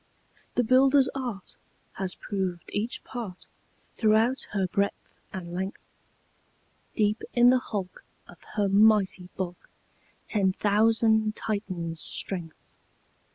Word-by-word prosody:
"The 245 - +3
builder's 260 +3 +5
art 245 -8 -5 0.4
Has 190 -1 -3
proved 190 -4 -4
each 215 +4 -2
part 215 -8 -7 0.5
Throughout 225 +4 +3
her 195 -2 0
breadth 200 +2 -2 0.2
and 175 -3 -7
length; 190 +2 -4 1.1
Deep 210 +1 +1
in 245 0 +7
the 255 - +4
hulk, 195 -7 -5 0.2
Of 175 - -15 0.2
her 205 -1 +2
mighty 200 -3 +4
bulk, 180 -2 -5 0.6
Ten 195 -3 +1
thousand 220 +1 +3
Titans' 180 -6 -3
strength." 170 -5 -2
205 Hz, 110 wpm, -27 LUFS, 185-225 Hz, 1.1 s, in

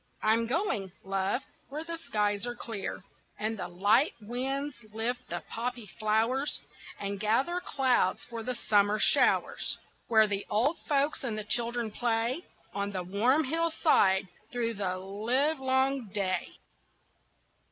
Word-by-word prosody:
I'm 225 +2 +3
going, 240 - 0
love, 195 +6 -1 0.3
where 300 +3 -4
the 335 0 -4
skies 210 -6 0
are 240 - -3
clear, 220 -5 -5 0.3
And 220 +1 -1
the - - -3
light 205 - +3
winds 265 +5 -3
lift 240 +3 -2
the - - -4
poppy 240 0 -4
flowers 225 +6 +1 0.4
And 200 0 -3
gather 260 - +1
clouds 255 - +1
for 230 -1 -5
the 250 +2 -2
summer 205 -2 +3
showers, - - +3 0.3
Where 220 -2 +6
the 205 -1 -1
old 255 +10 +2
folks 285 0 +2
and 230 -5 -2
the 215 - -2
children 235 +1 -1
play 235 +7 0 0.3
On 200 0 -2
the 185 -2 -3
warm 230 - +3
hillside 305 - +3 0.2
through 235 -2 -1
the 190 -3 -2
livelong 260 +6 +1
day. 185 -3 0
230 Hz, 130 wpm, -30 LUFS, 205-265 Hz, 0.4 s, Where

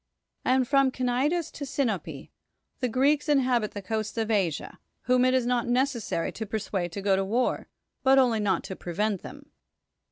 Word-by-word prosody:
And 255 -1 +2
from 275 0 +4
Cnidus 260 +7 0
to 285 - -7
Sinope 260 -8 -3 0.5
the 250 - 0
Greeks 285 +5 +2
inhabit 250 -6 +2
the 205 - -6
coasts 215 +2 -3
of 225 0 0
Asia, 180 -8 -1 0.2
whom 250 0 +3
it 255 0 +3
is 255 -2 +2
not 245 -1 0
necessary 245 -8 0
to 220 - -5
persuade 195 -4 -3
to 200 - -5
go 195 -1 +3
to 195 - 0
war, 230 +6 0 0.3
but 270 0 +5
[only] 245 -4 +4
not 205 -2 0
to 190 - -6
prevent 195 +3 -2
them. 285 +1 -11
245 Hz, 170 wpm, -27 LUFS, 210-265 Hz, 0.5 s, but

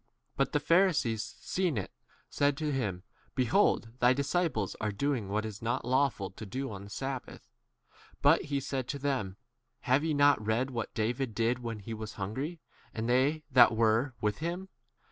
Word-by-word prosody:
But 135 -1 +1
the 150 - +2
Pharisees, 145 - +2
seeing 180 -5 0
[it], 95 - -3 0.4
said 145 -1 +1
to 150 0 -1
him, 100 -10 -2 0.3
Behold, 130 - +2
thy 125 0 +5
disciples 150 +5 0
are 105 -1 0
doing 115 -1 -1
what 105 +2 -1
is 105 -2 -7
not 120 +3 -1
3 125 - -4
lawful 130 -8 +1
to 95 - -10
do 130 +5 -4
on 100 0 -8
sabbath. 135 +3 -6 0.7
But - - +4
he 140 -1 -1
said 130 -2 -3
to 140 - -3
them, 130 -9 -2 0.4
Have 130 +4 +2
ye 160 -2 0
not 145 -5 +4
read 115 +5 0
what 115 -3 -4
David 115 +1 -1
did 115 +2 +1
when 115 -2 -4
he 105 +2 -7
was 110 0 -6
hungry, 110 - -3
f - - -31
and 110 +1 -2
they 135 +6 +2
that 125 -3 +7
were 115 +3 +2
with 105 -2 -1
4 165 - -2
him 185 +2 -6
125 Hz, 185 wpm, -31 LUFS, 110-140 Hz, 0.7 s, that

